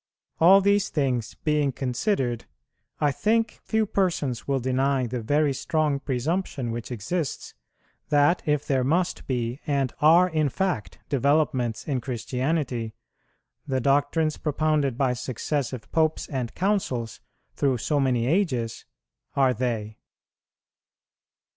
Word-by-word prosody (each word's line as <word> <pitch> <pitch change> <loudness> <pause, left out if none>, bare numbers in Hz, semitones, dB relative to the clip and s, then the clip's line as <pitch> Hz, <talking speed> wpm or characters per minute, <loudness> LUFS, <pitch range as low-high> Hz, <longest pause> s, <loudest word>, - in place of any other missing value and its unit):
All 190 +4 +7
these 200 0 +2
things 130 -6 -1
being 150 -2 +2
considered, 125 - -1 0.5
I 145 -1 +2
think 225 - 0
few 220 -1 0
persons 175 - -1
will 135 -1 +1
deny 130 +1 +1
the 120 0 -3
very 145 +5 +2
strong 155 0 0
presumption 135 -1 -2
which 115 +2 -5
exists, 135 - -3 0.6
that, 145 +3 +3
if 150 -1 +1
there 135 -3 +1
must 170 +7 0
be 120 0 -2
and 140 -4 0
are 165 +4 +6
in 155 -4 +1
fact 180 - -2
developments 140 -4 +1
in 135 -4 -1
Christianity, 125 -1 -2 0.7
the 130 -2 0
doctrines 145 +4 +1
propounded 150 -4 0
by 130 -2 +2
successive 130 +1 -3
Popes 160 -1 +1
and 130 -5 -3
Councils, 170 - -1 0.3
through 135 -3 +1
so 145 +5 0
many 125 -4 +1
ages, 130 - 0 0.5
are 135 -2 +4
they. 110 -3 -3
140 Hz, 120 wpm, -25 LUFS, 125-155 Hz, 0.7 s, All